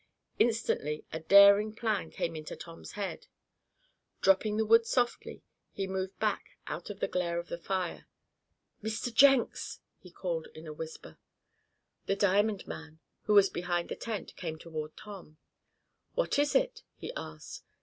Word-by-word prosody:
Instantly 220 -10 +1
a 160 - -2
daring 200 +5 +7
plan 215 -7 -1
came 165 -1 -3
into 155 -1 -6
Tom's 165 -1 -10
head. 205 -2 -5 0.9
Dropping 210 +2 +3
the 220 - +2
wood 230 +1 +5
softly, 245 -2 -1 0.3
he 195 - -3
moved 190 0 -3
back 215 -2 -2
out 175 - -5
of 200 -1 -7
the - - 0
glare 170 -2 -1
of 170 0 -4
the 170 - -3
fire. 185 -1 -3 0.7
"Mr. 220 +2 -3
Jenks!" 270 -1 +4 0.2
he 180 - -14
called 170 -2 -3
in 155 - -10
a 155 - -6
whisper. 160 +1 -9 0.9
The 195 - +2
diamond 200 +1 +2
man, 160 0 -8 0.3
who 210 - +3
was 200 -1 +7
behind 175 0 -1
the - - -3
tent, 220 -4 -5
came 160 -3 -5
toward 155 -2 -6
Tom. 190 -7 -11 0.8
"What - - +1
is 290 0 +2
it?" - - +2
he 485 - -7
asked. - - -8
195 Hz, 150 wpm, -31 LUFS, 170-215 Hz, 0.9 s, daring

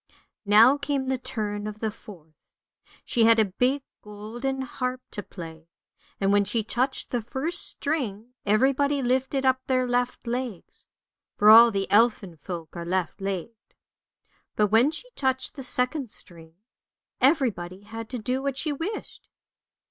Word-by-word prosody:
Now 230 +7 +6
came 280 -2 -1
the 260 -1 0
turn 210 -4 -3
of 215 0 -7
the 220 -1 -1
fourth; 170 -7 -14 0.7
she 230 -3 +2
had 230 0 +6
a 220 - +4
big 250 +8 0 0.2
golden 225 +6 -5
harp 255 0 -4
to 205 - -5
play, 165 -4 -10 0.5
and 195 0 +2
when 205 0 +4
she 215 +3 -1
touched 255 +4 -2
the 245 - 0
first 265 +9 -3
string 250 -6 -3
everybody 270 +6 +2
lifted 265 +2 0
up 260 0 +3
their 255 -1 +2
left 245 0 -1
legs 240 -5 -5 0.5
(for 210 +1 +7
all 230 +2 +10
the 195 -3 -1
elfin 210 -5 +3
folk 165 +1 -8
are 170 - -5
left 180 +2 -2
legged). 195 +4 -5 0.8
But 210 -1 +2
when 230 +6 +5
she 320 +11 -6
touched 260 - -1
the 275 - -8
second 255 +1 -1
string 165 -4 -6 0.7
everybody 220 - +1
had 225 +2 -8
to 250 - -4
do 250 +3 -2
what 275 -1 -2
she 305 +1 -1
wished. 355 +9 -6
235 Hz, 150 wpm, -26 LUFS, 205-265 Hz, 0.8 s, all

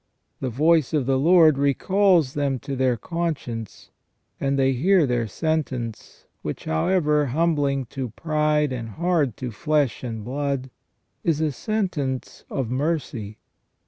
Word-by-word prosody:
The 130 - -2
voice 155 +4 +3
of 145 -4 +1
the 135 0 +2
Lord 160 -2 +5
recalls 170 +1 +3
them 140 -2 0
to 140 -1 -4
their 130 -2 +1
conscience, 140 - -4 0.5
and 140 0 0
they 135 0 +3
hear 175 +6 +3
their 120 -3 0
sentence, 130 - -3 0.2
which, - - -5
however 150 - +2
humbling 145 -2 +1
to 130 -3 -3
pride 150 +2 0
and 115 -3 -5
hard 160 - 0
to 125 -2 -4
flesh 145 +1 0
and 115 -3 -5
blood, 135 0 -2 0.5
is 160 -3 +1
a 155 -1 +1
sentence 155 - -3
of 125 -4 -2
mercy. 130 -7 -2
140 Hz, 135 wpm, -24 LUFS, 125-160 Hz, 0.5 s, Lord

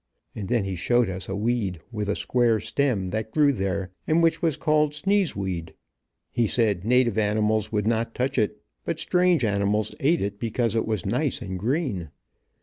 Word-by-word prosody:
And 100 -3 -5
then 120 -4 +2
he 95 -1 -3
showed 120 +4 +2
us 95 0 -6
a 95 - -2
weed, 105 -4 -1
with 105 -3 -3
a 100 - +1
square 120 -3 +2
stem, 110 -11 0
that 110 0 -3
grew 145 +3 +3
there, 95 -3 -2 0.2
and 165 +2 +3
which 165 - +2
was 160 -4 +1
called 150 -1 +2
sneeze 195 +3 +1
weed. 85 -5 -4 0.6
He 120 -2 +1
said 105 -6 +1
native 120 -1 +3
animals 110 0 +1
would 105 -2 0
not 115 0 0
touch 130 +2 0
it, 105 -5 -1 0.2
but - - -3
strange 180 -7 +2
animals 100 +1 0
eat 160 +4 +2
it 100 0 -3
because 115 -1 0
it 115 - 0
was 110 -6 -1
nice 130 +9 0
and 95 -6 -5
green. 115 - -1
110 Hz, 185 wpm, -25 LUFS, 100-130 Hz, 0.6 s, grew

